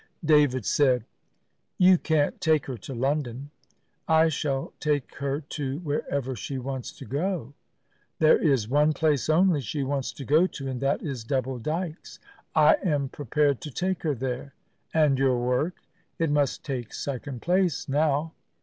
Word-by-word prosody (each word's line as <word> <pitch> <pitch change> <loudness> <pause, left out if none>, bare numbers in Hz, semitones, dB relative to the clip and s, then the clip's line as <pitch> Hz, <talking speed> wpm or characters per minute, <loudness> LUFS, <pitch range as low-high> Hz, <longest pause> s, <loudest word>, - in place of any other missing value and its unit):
David 145 -6 +4
said, 130 -5 +2 0.7
"You 185 -1 +6
can't 155 -3 0
take 155 -3 +2
her 130 - -5
to 120 +4 -8
London." 135 +1 -2 0.6
"I 160 0 +5
shall 140 -3 -2
take 150 -3 -1
her 140 +1 -2
to 140 -2 -4
wherever 140 -4 -2
she 135 +4 -5
wants 130 -1 -5
to - - -11
go." 145 - -2 0.6
"There 155 -1 +5
is 135 -9 +2
one 150 +4 +3
place 150 -2 +1
only 165 -1 +4
she 135 +4 -3
wants 135 -1 -2
to 135 - -8
go 155 +8 +4
to, 140 -6 -7
and 130 -1 -4
that 140 +1 0
is 135 -7 -4
Double 130 +1 -2
Dykes." 160 +5 -4 0.4
"I 155 -1 +6
am 145 -7 0
prepared 145 0 0
to 150 - -6
take 185 +6 -2
her 150 -4 0
there." 130 +2 -4 0.4
"And 150 -4 +3
your 130 -2 +3
work?" 125 +8 0 0.4
"It 165 -3 0
must 145 -2 0
take 125 -5 -4
second 135 -2 -5
place 180 -3 +1
now. 150 +2 +1
145 Hz, 160 wpm, -26 LUFS, 130-155 Hz, 0.7 s, You